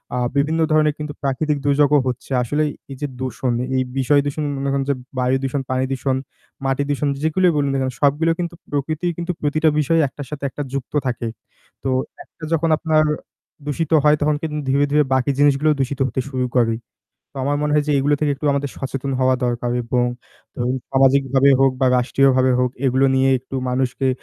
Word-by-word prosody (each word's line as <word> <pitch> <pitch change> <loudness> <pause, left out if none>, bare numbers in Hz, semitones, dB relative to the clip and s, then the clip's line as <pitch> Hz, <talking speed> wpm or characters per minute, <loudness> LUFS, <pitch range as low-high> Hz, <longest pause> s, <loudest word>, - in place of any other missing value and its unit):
আ - - -1 0.2
বিভিন্ন 155 +3 +1
ধরনের 155 -1 +3
কিন্তু 150 -1 -5
প্রাকৃতিক 145 +2 0
দুর্যোগও 145 +1 +4
হচ্ছে। 125 +2 -4
আসলেই 150 +5 0 0.2
এই - - -6
যে 145 - -1
দূষণ, 130 -1 -2 0.2
এই 130 - +2
বিষয় 140 +2 +3
দূষণ 145 +2 -2
মনে 140 0 -2
করেন 135 -1 0
যে 140 - +2 0.2
বায়ু 125 +1 +2
দূষণ, 135 +1 -1
পানি 130 0 0
দূষণ, 130 0 0 0.5
মাটি 135 +1 +1
দূষণ 145 0 0
যেগুলোই 175 +3 +3
বলুন 140 -1 +1
না - - 0
কেন, 130 0 -1
সবগুলো 150 +4 +3
কিন্তু 170 -1 -3 0.2
প্রকৃতি 155 +4 -2
কিন্তু 170 +1 -2
প্রতিটা 155 +2 +2
বিষয় 165 +3 +2
একটার 140 +1 -8
সাথে 140 -1 -6
একটা 145 - -5
যুক্ত 140 +1 -4
থাকে। 120 -1 -2 0.6
তো 135 - -1 0.3
একটা 160 - -20
যখন 165 0 +1
আপনার 155 -2 +2 0.6
দূষিত 155 +2 -2
হয় 150 0 +5
তখন 150 0 +2
কিন্তু 150 -2 -3
ধীরে, 140 +2 +3
ধীরে, 150 0 +4
বাকি 130 +2 +2
জিনিসগুলোও 145 +1 +3
দূষিত 135 +1 -2
হতে 130 - -2
শুরু 130 -2 -1
করে। 115 -2 +3 0.6
তো - - -19
আমার 145 +1 +1
মনে 150 - 0
হয় 150 -1 +3
যে - - +3
এইগুলো 145 +2 +2
থেকে 150 -1 +1
একটু 150 - -4
আমাদের 140 -1 -2
সচেতন 135 0 -4
হওয়া 130 0 +3
দরকার 120 0 -1
এবং 120 +1 0 0.5
ধরুন 125 +1 -1
সামাজিকভাবে 135 0 +4
হোক 135 -1 +4
বা 130 - +3
রাষ্ট্রীয়ভাবে 130 0 +3
হোক 125 -1 +1 0.2
এগুলো 130 +2 +3
নিয়ে 135 0 +3
একটু 130 +2 -12
মানুষকে 130 +1 0
140 Hz, 190 wpm, -20 LUFS, 130-150 Hz, 0.6 s, হয়